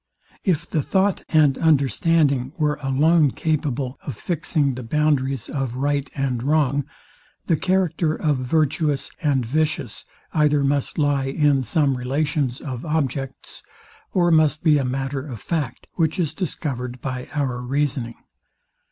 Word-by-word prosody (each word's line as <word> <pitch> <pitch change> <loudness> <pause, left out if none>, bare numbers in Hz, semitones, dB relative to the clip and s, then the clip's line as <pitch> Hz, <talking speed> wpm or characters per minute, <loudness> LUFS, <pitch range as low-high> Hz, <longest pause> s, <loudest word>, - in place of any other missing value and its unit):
If 180 -7 0
the 155 - 0
thought 190 +6 +1
and 150 -4 +4
understanding 140 -2 +2
were 150 -2 0
alone 150 +3 +3
capable 140 -4 -2
of 130 -7 -6
fixing 150 - 0
the 130 - -6
boundaries 135 -1 0
of 135 -4 -3
right 140 +1 -1
and 130 -4 -1
wrong, 145 0 +1 0.6
the 165 - +2
character 175 -2 +1
of 150 -3 0
virtuous 145 +2 0
and 140 -6 +1
vicious 150 -2 -1 0.3
either 150 -2 +3
must 140 0 0
lie 145 -3 +2
in 140 0 +2
some 140 +2 +1
relations 135 +1 -1
of 130 -4 -5
objects, 140 -4 -3 0.5
or 175 -2 +3
must 155 -1 +3
be 155 -3 +5
a - - 0
matter 135 +1 -2
of 130 -7 -7
fact, 140 - -3
which 160 0 0
is 160 -4 0
discovered 130 -8 -4
by 125 -1 -5
our 130 -4 -1
reasoning. 130 -2 -1
145 Hz, 135 wpm, -22 LUFS, 130-155 Hz, 0.6 s, be